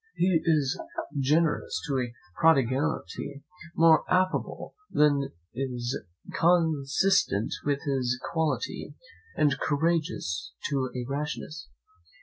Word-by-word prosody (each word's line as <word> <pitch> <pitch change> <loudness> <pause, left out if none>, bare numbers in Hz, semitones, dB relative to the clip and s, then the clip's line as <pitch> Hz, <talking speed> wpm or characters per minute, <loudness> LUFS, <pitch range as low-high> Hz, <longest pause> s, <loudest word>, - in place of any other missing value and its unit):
He 180 -3 +3
is 150 -5 +2 0.4
generous 150 +4 +1
to 135 -2 0
a 125 -2 -2 0.3
prodigality, 140 0 +1 0.3
more 165 -1 +6
affable 185 0 0 0.2
than 145 -2 +3 0.2
is 125 -1 -3 0.3
consistent 160 - +2
with 140 -1 0
his 130 -4 0
quality, 160 - -2 0.4
and 140 -2 +2
courageous 145 - -1 0.2
to 135 -2 0
a 125 -1 -3
rashness. 150 +2 -4
145 Hz, 95 wpm, -28 LUFS, 130-160 Hz, 0.4 s, more